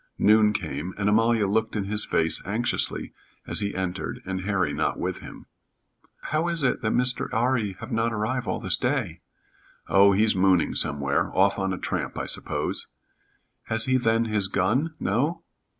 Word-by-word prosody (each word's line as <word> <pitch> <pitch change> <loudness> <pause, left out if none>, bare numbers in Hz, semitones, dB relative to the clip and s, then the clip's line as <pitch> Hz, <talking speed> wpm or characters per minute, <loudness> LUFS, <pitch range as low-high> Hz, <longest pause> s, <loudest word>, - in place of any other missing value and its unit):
Noon 105 0 +5
came, 80 -2 -4
and 100 0 -1
Amalia 115 +1 +3
looked 110 +3 0
in 105 - -1
his 105 +2 -1
face 80 0 +2
anxiously 115 +4 -1 0.3
as - - -1
he 100 -1 -2
entered 95 0 -3
and 95 0 -3
Harry 95 -7 0
not 75 +1 -1
with - - -3
him. - - -11 0.8
"How 155 +2 -1
is 170 -3 -2
it 125 - +1
that 110 - 0
Mr. 125 0 0
'Arry 115 -3 0
have 115 +3 -8
not 115 +1 0
arrive 115 +2 -2
all 95 - -2
this - - +1
day?" - - -2 0.7
"Oh, 100 +1 +5
he's 105 +2 +3
mooning 95 -2 +3
somewhere. 70 -1 0
Off - - +3
on 95 0 -1
a 95 - -3
tramp - - -4
I - - -3
suppose." - - 0 0.8
"Has 110 0 +3
he 130 0 +2
then 115 -2 +1
his 105 -3 +1
gun? 120 - 0
No?" 145 - -1
105 Hz, 170 wpm, -25 LUFS, 95-115 Hz, 0.8 s, Noon